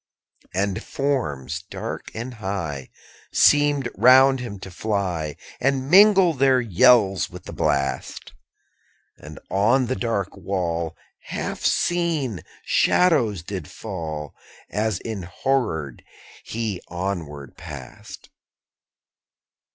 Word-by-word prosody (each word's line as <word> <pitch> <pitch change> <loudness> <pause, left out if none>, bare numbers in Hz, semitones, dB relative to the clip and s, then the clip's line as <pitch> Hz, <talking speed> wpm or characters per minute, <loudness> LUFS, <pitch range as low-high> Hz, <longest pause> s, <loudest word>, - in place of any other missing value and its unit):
12. 95 +2 +1
And 95 - -4
forms, 80 - -2
dark - - -6
and 120 +3 -5
high, 90 - -4 0.4
_65 - - -6
Seemed 145 -3 +4
around 130 +3 +7
him 120 -5 -6
to 95 - -8
fly, 90 -7 -2 0.2
And 135 +1 0
mingle 195 -2 +7
their 135 -2 +3
yells 100 -2 +4
with - - -11
the - - -9
blast: 70 0 -1 0.9
And - - -10
on 115 +7 +3
the 130 +2 -2
dark 105 -6 -2
wall 85 -4 -3 0.3
Half - - -4
seen 160 - 0 0.2
shadows 120 - +3
did 90 -4 -6
fall, 80 -8 -6 0.4
As 110 +1 -1
enhorrored 95 - -2 0.4
he 110 -5 -3
onward 85 -7 -5
passed. 75 -6 -10
100 Hz, 105 wpm, -23 LUFS, 85-130 Hz, 0.9 s, around